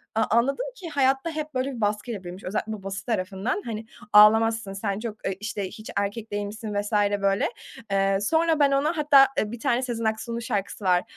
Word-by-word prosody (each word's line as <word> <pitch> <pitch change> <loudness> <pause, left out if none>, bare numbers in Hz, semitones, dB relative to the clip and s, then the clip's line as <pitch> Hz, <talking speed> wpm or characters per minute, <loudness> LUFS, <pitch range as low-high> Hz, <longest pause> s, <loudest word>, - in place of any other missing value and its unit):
A 220 - +3
anladım 265 - +2
ki, 365 -8 -8
hayatta 270 +1 +1
hep 310 -1 -5
böyle 260 +1 -1
bir 230 - -7
baskıyla 210 0 -2
büyümüş, 180 +2 -9
özellikle 210 +3 -3
babası 195 -2 -6
tarafından. 200 0 -2
Hani, 225 -1 -5 0.3
ağlamazsın, 220 0 +6
sen 200 0 -3
çok, 220 -2 -5
eee, 195 - -1
işte, 205 -2 -3
hiç 215 +3 -10
erkek 205 +3 -2
değilmişsin 205 +1 -4
vs. 205 - -7 0.3
böyle. 195 0 +2 0.4
Eee, 195 0 +2
sonra 320 +7 +2
ben 285 -1 +4
ona 295 +5 +1
hatta, 285 -3 +6
eee, 210 - 0
bir 240 - -7
tane 240 +2 +1
Sezen 235 -3 -3
Aksu'nun 220 +2 -2
şarkısı 205 -2 -3
var, 180 -1 +3
220 Hz, 190 wpm, -25 LUFS, 200-255 Hz, 0.4 s, ağlamazsın